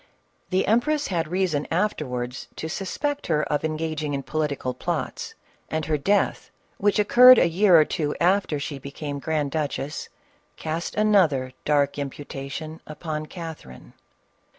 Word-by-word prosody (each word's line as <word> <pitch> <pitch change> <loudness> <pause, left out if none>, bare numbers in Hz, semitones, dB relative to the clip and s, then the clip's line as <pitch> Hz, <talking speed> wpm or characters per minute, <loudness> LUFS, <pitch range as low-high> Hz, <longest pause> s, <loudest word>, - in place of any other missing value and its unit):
The 185 0 +1
empress 290 +7 +1
bad 165 -4 -1
reason 175 -4 0
afterwards 135 -9 -2
to 160 - -4
suspect 285 - -3
her 150 -2 +2
of 145 - 0
engaging 155 -2 -2
in 135 - -3
political 140 -2 -2
plots, 125 - -4 0.3
and 155 -1 -2
her 150 0 0
death, 200 +7 +1 0.3
which 205 0 +2
occur 240 +4 +6
red 255 -1 +11
a - - +5
year 175 0 +5
or 155 - +5
two 150 -3 -2
after 180 -4 +2
she 140 0 -5
became 140 +1 -6
grand 150 -1 -1
duchess, 150 -1 -3 0.5
cast 160 +2 -4
another 175 -12 +3
dark 145 -1 +2
imputation 140 +2 -6
upon 155 0 -5
Catherine. 160 - -9
155 Hz, 140 wpm, -24 LUFS, 145-185 Hz, 0.5 s, red